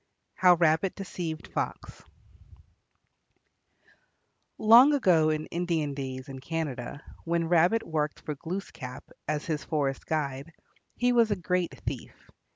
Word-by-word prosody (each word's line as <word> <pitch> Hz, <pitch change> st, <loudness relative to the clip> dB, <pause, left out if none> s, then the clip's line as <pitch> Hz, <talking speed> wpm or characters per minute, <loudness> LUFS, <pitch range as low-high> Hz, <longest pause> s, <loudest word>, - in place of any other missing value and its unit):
HOW 180 Hz, -1 st, +5 dB
RABBIT 165 Hz, +2 st, +2 dB
DECEIVED 175 Hz, -5 st, -5 dB
FOX -, -, -4 dB, 2.6 s
Long 240 Hz, +7 st, +7 dB
ago 175 Hz, -, +4 dB
in 155 Hz, 0 st, -1 dB
Indian 165 Hz, -4 st, -1 dB
days 130 Hz, -1 st, -5 dB
in 135 Hz, -1 st, -8 dB
Canada, 145 Hz, -2 st, -4 dB, 0.2 s
when 170 Hz, 0 st, 0 dB
Rabbit 175 Hz, +6 st, +4 dB
worked 150 Hz, -2 st, -1 dB
for 150 Hz, -, -4 dB
Glooskap 150 Hz, -5 st, -7 dB, 0.2 s
as 150 Hz, 0 st, -2 dB
his 155 Hz, -3 st, -2 dB
forest 140 Hz, -4 st, -2 dB
guide, 145 Hz, 0 st, -3 dB, 0.4 s
he 245 Hz, 0 st, +2 dB
was 235 Hz, -2 st, +4 dB
a 205 Hz, -, +1 dB
great 180 Hz, -1 st, -2 dB
thief. -, -, -5 dB
160 Hz, 120 wpm, -28 LUFS, 150-180 Hz, 2.6 s, Long